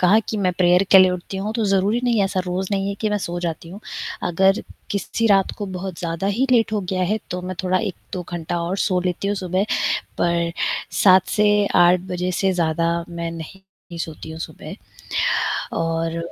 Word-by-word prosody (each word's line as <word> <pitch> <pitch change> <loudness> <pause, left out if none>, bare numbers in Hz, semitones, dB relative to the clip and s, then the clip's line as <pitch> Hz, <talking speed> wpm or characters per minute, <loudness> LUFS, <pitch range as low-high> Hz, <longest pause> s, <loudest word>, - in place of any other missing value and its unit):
कहा 185 +4 +5
कि 220 - -2
मैं 185 -3 +1
प्रेयर 180 +1 +5
के 190 - +9
लिए 185 0 +7
उठती 180 +1 -5
हूँ। 200 +3 -3
तो 225 -2 0
ज़रूरी 200 +4 +2
नहीं 240 -2 +2
है 200 - +4
ऐसा 190 -1 -1
रोज़ 180 +1 -2
नहीं 195 0 0
है 200 - -2
कि 215 - 0
मैं 210 - +1
सो 175 -2 -4
जाती 165 -1 -4
हूँ। 195 +5 -9 0.5
अगर 190 +3 +3 0.3
किसी 205 +3 -1
रात 195 -3 +4
को 205 - -3
बहुत 185 -1 -6
ज़्यादा 170 +2 -3
ही 235 +7 +1
लेट 225 -2 +3
हो 210 - +1
गया 185 0 -2
है। 205 +4 +1
तो 180 - -3
मैं 185 0 -5
थोड़ा 185 0 +2
1-2 190 -3 -5
घंटा 170 0 -3
और 175 +3 -2
सो 185 -3 +1
लेती 180 +2 -2
हूँ 205 - +1
सुबह। 185 +1 0 0.5
पर 170 -1 +1 0.5
7 185 -1 +6
से 210 -1 +3
8 175 0 +6
बजे 180 0 -1
से 195 -1 +3
ज़्यादा 170 -1 +1 0.2
मैं 170 -1 -4
नहीं 165 +4 -9 0.4
सोती 160 -1 -6
हूँ 160 - -8
सुबह - - -7 1.0
और 165 0 -1
185 Hz, 200 wpm, -22 LUFS, 175-200 Hz, 1.0 s, के